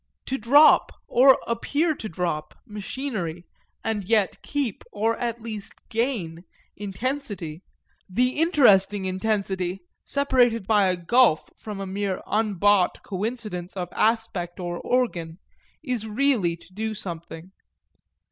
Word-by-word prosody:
To 265 - -2
drop, 285 +7 +6 0.2
or 260 +2 +6
appear 290 +8 0
to 220 -7 -7
drop, 170 -3 -3
machinery 205 - -5 0.4
and 220 -2 -1
yet 210 0 +1
keep, 280 -8 -3
or 225 +2 0
at 235 -1 -3
least 215 -3 -6 0.2
gain, 220 -9 -2 0.3
intensity, 205 - -4 0.5
the 245 +7 +2
interesting 205 - +4
intensity 190 -1 -1 0.2
separated 245 -6 +2
by 205 -2 +4
a 180 -1 +1
gulf 175 -1 +3
from 210 -2 -7
a 195 - -3
mere 195 0 -2
unbought 205 -3 +2
coincidence 200 -3 -4
of 175 -2 -3
aspect 215 -6 0
or 175 -1 -4
organ, 175 -10 -1 0.5
is 250 -6 -2
really 220 -7 +1
to 170 +2 -19
do 220 +2 -3
something. 170 -2 -7
210 Hz, 120 wpm, -25 LUFS, 185-235 Hz, 0.5 s, drop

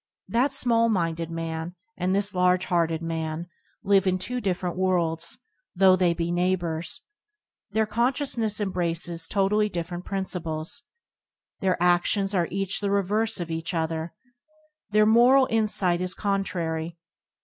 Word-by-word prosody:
That 250 +4 +1
small 230 -4 +3
minded 165 -5 -1
man 165 +1 -4 0.2
and 185 +1 0
this 200 0 0
large 180 0 +2
hearted 165 -2 0
man 160 0 -3 0.4
live 195 -1 +3
in 185 0 +2
two 250 +7 -3
different 180 -3 -2
worlds, 175 +1 0 0.4
though 190 0 +6
they 180 -2 +2
be 170 0 -2
neighbours. 175 -2 -1 0.7
Their 220 +2 +1
con 235 +4 +1
sciousness 235 -7 -1
embraces 170 -3 -1
totally 210 +2 +2
different 175 0 -5
prin 195 -1 -2
ciples. 160 -4 -4 0.8
Their 190 -2 +1
adions 180 +3 +2
are 175 -2 +2
each 195 +1 -1
the 200 - 0
reverse 205 +2 0
of 175 - -3
the 165 0 -3
other. 160 0 -2 0.7
Their 215 0 +4
moral 245 +5 +6
insight 205 -5 +2
is 185 0 -1
contrary. 170 -5 -2
185 Hz, 140 wpm, -25 LUFS, 170-205 Hz, 0.8 s, though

